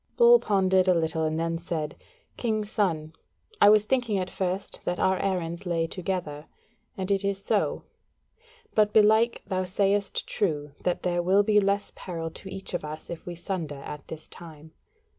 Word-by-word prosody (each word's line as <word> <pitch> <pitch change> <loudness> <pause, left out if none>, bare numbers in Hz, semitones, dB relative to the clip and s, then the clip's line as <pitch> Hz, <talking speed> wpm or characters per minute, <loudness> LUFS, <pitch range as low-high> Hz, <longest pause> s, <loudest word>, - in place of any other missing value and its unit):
Bull 475 0 +8
pondered 190 - +2
a 180 - +5
little 160 -1 +1
and 155 +1 -1
then 165 0 -1
said: 165 -3 -4 0.4
"King's 215 -3 -2
son, 160 -6 0 0.5
I - - +9
was 210 0 +5
thinking 240 -4 +1
at 185 -1 -3
first 190 +1 -3
that 175 - -2
our 190 0 +2
errands 175 -2 -2
lay 170 -3 0
together, 165 -4 -4 0.5
and 190 +1 -2
it 195 0 +2
is 200 -1 -1
so; - - 0 0.9
but 210 -1 +3
belike 220 +2 +4
thou 185 -2 -1
sayest 195 +2 0
true 150 -8 -1
that 180 -1 -1
there 175 -1 +1
will 190 +4 +4
be 210 0 +4
less 200 0 0
peril 165 -3 -5
to 190 - -9
each 190 0 -7
of 175 - -2
us 155 +2 -7
if 170 - -8
we 175 - -5
sunder 165 -6 -5
at 150 -1 -8
this 160 0 -9
time. 160 -2 -13
185 Hz, 175 wpm, -27 LUFS, 165-200 Hz, 0.9 s, I